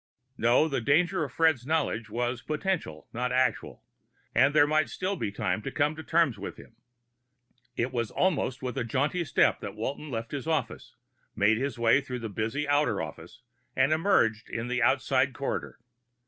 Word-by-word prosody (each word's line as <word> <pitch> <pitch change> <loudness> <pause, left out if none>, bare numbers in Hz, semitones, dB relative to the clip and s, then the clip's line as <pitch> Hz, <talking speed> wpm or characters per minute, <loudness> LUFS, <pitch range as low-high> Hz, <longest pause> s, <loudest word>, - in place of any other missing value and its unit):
No; 120 +7 +3
the 135 -5 -1
danger 175 +9 +2
in 145 - -4
Fred's 160 -3 +2
knowledge 130 -7 -1
was 120 +2 -2
potential, 155 - -3
not 125 +2 -2
actual, 130 0 0 0.5
and 140 +2 +4
there 145 0 +5
might 155 0 +1
still 190 +2 -2
be 105 - -3
time 105 +2 -1
to 120 - -4
come 145 +3 0
to 160 - -7
terms 160 -8 +1
with 100 - -6
him. 115 - -15 1.0
It 120 +2 0
was 115 -3 -1
almost 140 -9 0
with 125 -2 -3
a - - 0
jaunty 145 +9 0
step 145 - +2
that - - -7
Walton 140 +7 -4
left 115 -3 -4
his 145 +1 -5
office, 160 -1 -2 0.4
made 105 +2 +3
his 135 0 -2
way 120 +4 +4
through 130 -2 -5
the 115 - -4
busy 110 +8 -2
outer 145 +1 +2
office, - - -8 0.3
and 135 +3 +3
emerged 140 - +2
in 115 +1 -4
the 125 0 0
outside - - +2
corridor. - - -4
130 Hz, 175 wpm, -28 LUFS, 115-155 Hz, 1.0 s, there